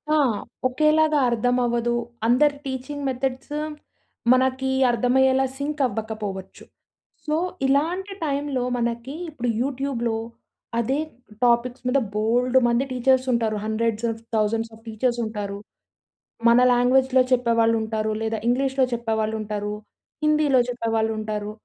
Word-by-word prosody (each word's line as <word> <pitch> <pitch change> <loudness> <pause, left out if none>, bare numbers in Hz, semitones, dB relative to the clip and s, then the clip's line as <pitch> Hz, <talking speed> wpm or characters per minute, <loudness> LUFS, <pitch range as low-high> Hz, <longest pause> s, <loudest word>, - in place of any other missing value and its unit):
ఆ! - - +4 0.5
ఒకేలాగా 305 +2 +3
అర్థం 245 +2 +1
అవ్వదు. 240 0 0 0.3
అందరి 285 +4 +4
వటీచింగ్ 280 +1 -5
మెథడ్స్ 260 +2 -3 0.8
మనకి 260 +1 +2 0.2
అర్థమయ్యేలా 260 +3 +3
సింక్ 290 +1 -3
అవ్వకపోవచ్చు. 210 -3 -6 0.6
సో 305 0 0 0.3
ఇలాంటి 350 +8 0
టైమ్‌లో 280 -3 -1
మనకి 235 +4 -3
ఇప్పుడు 245 -5 -3
యూట్యూబ్‌లో 255 -4 -1 0.6
అదే 265 +5 0 0.5
టాపిక్స్ 240 +2 +1
మీద 275 +2 +3
బోళుడు 245 +4 +2
మంది 235 +2 +2
టీచర్స్ 260 +1 +2
ఉంటారు. 225 -2 0
Hundreds 225 +1 -1
of 225 0 -8
thousands 225 +1 0
of 225 - -20
teachers 240 +2 -1
ఉంటారు. 205 -2 -4 0.9
మన 235 +1 +6
లాంగ్వేజ్‍లో 255 +1 +4
చెప్పేవాళ్ళు 230 -2 +3
ఉంటారు. 220 0 -2
లేదా 225 0 -1
ఇంగ్లీష్‌లో 265 +1 +2
చెప్పేవాళ్ళు 220 -2 -1
ఉంటారు. 210 0 -3 0.5
హిందీలో 300 -4 +4
చెప్పేవాళ్ళు 225 -2 0
ఉంటారు. 210 -1 -4
245 Hz, 115 wpm, -23 LUFS, 225-265 Hz, 0.9 s, మన